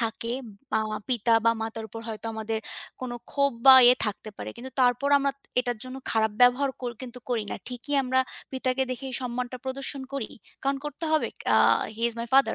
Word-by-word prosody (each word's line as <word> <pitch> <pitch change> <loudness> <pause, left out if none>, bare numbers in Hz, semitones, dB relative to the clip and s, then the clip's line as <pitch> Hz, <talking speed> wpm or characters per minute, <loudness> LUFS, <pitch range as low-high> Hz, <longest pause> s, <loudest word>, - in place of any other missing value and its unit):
থাকে 230 +1 -2 0.4
বা 220 - +3 0.3
পিতা 235 -2 +3
বা 230 - +6
মাতার 225 0 -5
উপর 225 +2 -8
হয়তো 220 0 -5
আমাদের 220 0 -2 0.4
কোনো 250 -1 -4 0.2
ক্ষোভ 280 -1 +2
বা 265 - +12
ইয়ে 245 - +8
থাকতে 210 +1 -4
পারে, - - -6
কিন্তু 255 +3 -8
তারপরও 255 +3 +3
আমরা 275 0 0 0.3
এটার 245 -2 -2
জন্য 255 +1 -7
খারাপ 220 -1 +2
ব্যবহার 250 +3 +5
কর 245 - -2
কিন্তু 250 -1 -7
করি 230 -3 0
না। - - -3
ঠিকই 250 +4 -4
আমরা 260 0 +2 0.3
পিতাকে 260 0 0
দেখেই 260 +1 -4
সম্মানটা 250 0 -3
প্রদর্শন 270 +1 -3
করি 275 -6 -3 0.3
কারণ 275 0 +1
করতে 295 +2 -5
হবে। 310 - +2 0.3
আ - - +6 0.4
He 230 - -6
is 235 - -6
my 235 - -4
father 270 0 +5
250 Hz, 190 wpm, -27 LUFS, 230-265 Hz, 0.4 s, বা